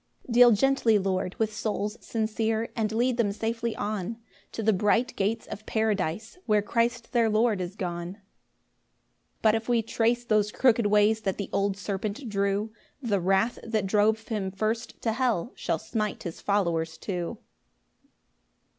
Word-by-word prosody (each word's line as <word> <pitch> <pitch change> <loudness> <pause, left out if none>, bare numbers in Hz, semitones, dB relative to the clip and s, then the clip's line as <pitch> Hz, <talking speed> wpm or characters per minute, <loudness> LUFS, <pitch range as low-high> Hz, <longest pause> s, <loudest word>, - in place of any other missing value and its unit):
4 - - -8
Deal 245 0 +8
gently, 230 0 +3
Lord, 190 -1 -1
with 220 -1 0
souls 210 -1 -2
sincere, 220 0 -1
And 220 -2 0
lead 240 +2 +1
them 220 -4 +2
safely 230 +2 -2
on 210 +1 -3 0.3
To 225 - -4
the 220 +1 +4
bright 215 +6 +1
gates 215 +3 -1
of 215 - -8
Paradise, 220 - -1
Where 210 -2 +3
Christ 235 +2 0
their 235 -3 +3
Lord 215 -2 +2
is 180 +1 -5
gone. 175 -2 -4
5 205 - -27 1.2
But 215 -1 +5
if 225 +1 -2
we 235 -2 +3
trace 235 +2 0
those 215 -2 +2
crooked 235 -3 +3
ways 210 +1 +3
That 195 -3 -2
the 200 - -5
old 200 0 +1
serpent 205 +5 -4
drew, 200 +1 0 0.3
The 225 -7 0
wrath 195 +6 +1
that 220 -3 -1
drove 215 +3 +2
him 205 -4 -1
first 215 +4 -3
to 225 - +1
hell 240 -4 0
Shall - - -1
smite 215 -2 -3
his 170 - -6
followers 170 -5 0
too. 180 -4 -4
215 Hz, 160 wpm, -27 LUFS, 200-230 Hz, 1.2 s, Deal